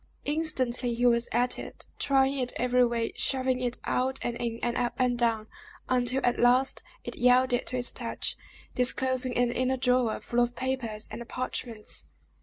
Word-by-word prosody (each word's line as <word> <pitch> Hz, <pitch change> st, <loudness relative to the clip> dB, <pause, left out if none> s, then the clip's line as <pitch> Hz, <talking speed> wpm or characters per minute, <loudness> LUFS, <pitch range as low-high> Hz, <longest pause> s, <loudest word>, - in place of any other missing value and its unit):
Instantly 260 Hz, -6 st, 0 dB
he 240 Hz, +1 st, 0 dB
was 235 Hz, -1 st, +3 dB
at 245 Hz, +2 st, +1 dB
it, -, -, -8 dB
trying 270 Hz, 0 st, +2 dB
it 250 Hz, -1 st, -1 dB
every 250 Hz, 0 st, +3 dB
way, 235 Hz, -1 st, 0 dB
shoving 260 Hz, -1 st, 0 dB
it 245 Hz, -1 st, -1 dB
out 260 Hz, +1 st, 0 dB
and 240 Hz, -, -1 dB
in, 235 Hz, -1 st, -3 dB
and 240 Hz, 0 st, 0 dB
up 245 Hz, -1 st, -1 dB
and 250 Hz, -1 st, +2 dB
down, 230 Hz, -3 st, +1 dB, 0.4 s
until 255 Hz, +1 st, +1 dB
at 245 Hz, 0 st, +1 dB
last 250 Hz, +2 st, +3 dB, 0.2 s
it -, -, -7 dB
yielded 250 Hz, 0 st, +3 dB
to -, -, -3 dB
his 245 Hz, -1 st, +2 dB
touch, 235 Hz, -2 st, -2 dB, 0.4 s
disclosing 255 Hz, 0 st, +1 dB
an 245 Hz, -1 st, +2 dB
inner 255 Hz, +1 st, 0 dB
drawer, 250 Hz, -3 st, +1 dB
full 240 Hz, -, -2 dB
of 245 Hz, 0 st, +1 dB
papers 245 Hz, -5 st, -3 dB
and 235 Hz, 0 st, -7 dB
parchments. 235 Hz, -3 st, -5 dB
245 Hz, 170 wpm, -28 LUFS, 240-255 Hz, 0.4 s, was